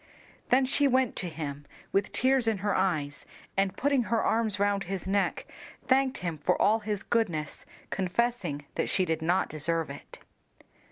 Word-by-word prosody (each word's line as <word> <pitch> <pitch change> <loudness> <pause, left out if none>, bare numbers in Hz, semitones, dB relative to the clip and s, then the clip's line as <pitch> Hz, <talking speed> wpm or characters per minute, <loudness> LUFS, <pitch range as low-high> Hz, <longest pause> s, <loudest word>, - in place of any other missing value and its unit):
Then 260 +2 +4
she 280 +2 +3
went 260 -2 +2
to 180 - -2
him 145 -3 -6 0.2
with 195 +1 +1
tears 260 -1 +2
in 220 -2 +2
her 205 - +2
eyes, 155 -7 0 0.3
and 195 -1 +1
putting 275 -3 +2
her 230 0 +1
arms 220 -3 +1
round 200 -1 +1
his 190 0 -4
neck, 200 +1 0 0.4
thanked 265 0 +3
him 165 -3 -3
for 180 +5 +1
all 220 +2 +4
his 210 -2 -3
goodness, 175 -11 -1 0.2
confessing 185 -6 -1
that - - -1
she 185 - +2
did 160 -1 -1
not 175 +3 +2
deserve 160 0 0
it. 140 - -10
195 Hz, 165 wpm, -29 LUFS, 165-230 Hz, 0.4 s, Then